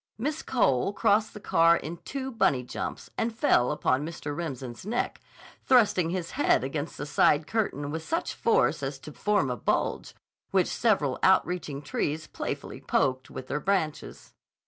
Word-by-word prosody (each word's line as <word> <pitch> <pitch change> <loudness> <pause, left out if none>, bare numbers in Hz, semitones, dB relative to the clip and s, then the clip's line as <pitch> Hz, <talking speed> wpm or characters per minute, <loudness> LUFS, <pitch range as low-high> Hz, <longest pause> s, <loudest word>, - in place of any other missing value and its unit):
Miss 295 +7 -2
Cole 165 - +1
crossed 215 0 +2
the - - -7
car 165 -3 +4
in 165 +3 -6
two 265 +7 -5
bunny 190 - +2
jumps 125 - -6
and 225 0 -1
fell 125 - +3
upon 140 -2 +1
Mr. 150 -2 -5
Remsen's 130 -7 -5
neck, 230 +5 -2 0.4
thrusting 210 -9 +4
his 175 -1 -3
head 290 - +2
against 145 +3 -4
the 145 - -4
side 150 0 +3
curtain 150 -9 -2
with 160 +1 -3
such 330 - -2
force 465 +1 +2
as - - -3
to - - -10
form 205 -11 +1
a - - -1
bulge, - - -1 0.3
which - - +3
several - - +1
outreaching 155 -5 +2
trees 155 +2 -2
playfully - - -5
poked 130 -2 0
with 130 - -7
their 150 - -2
branches. 180 -4 -2
165 Hz, 160 wpm, -27 LUFS, 145-215 Hz, 0.4 s, car